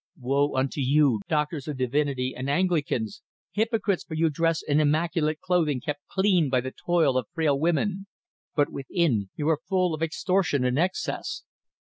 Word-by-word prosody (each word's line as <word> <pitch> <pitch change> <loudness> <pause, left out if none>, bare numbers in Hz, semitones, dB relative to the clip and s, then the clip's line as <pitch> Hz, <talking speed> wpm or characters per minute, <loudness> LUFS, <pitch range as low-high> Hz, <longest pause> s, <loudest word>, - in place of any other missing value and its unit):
Woe 140 +3 +1
unto 135 +2 0
you, 135 -3 +3
doctors 150 -1 -1
of 150 -3 -4
divinity 130 0 0
and 130 +2 -4
Anglicans, 145 - 0 0.3
hypocrites! 215 -3 0
for 160 - -7
you 160 0 +2
dress 165 +2 0
in 145 0 +2
immaculate 155 +1 +1
clothing 165 -7 +1
kept 145 +3 -5
clean 190 -6 +2
by 130 -1 +2
the 130 +1 -4
toil 160 -6 +1
of 120 - -7
frail 150 -4 +2
women, 190 +5 0 0.5
but 145 -2 +2
within 135 - 0
you 150 - -2
are 155 -2 +1
full 185 -3 +2
of 155 - -5
extortion 165 -3 +1
and 125 +3 +1
excess. 185 - -2
150 Hz, 160 wpm, -26 LUFS, 135-175 Hz, 0.5 s, you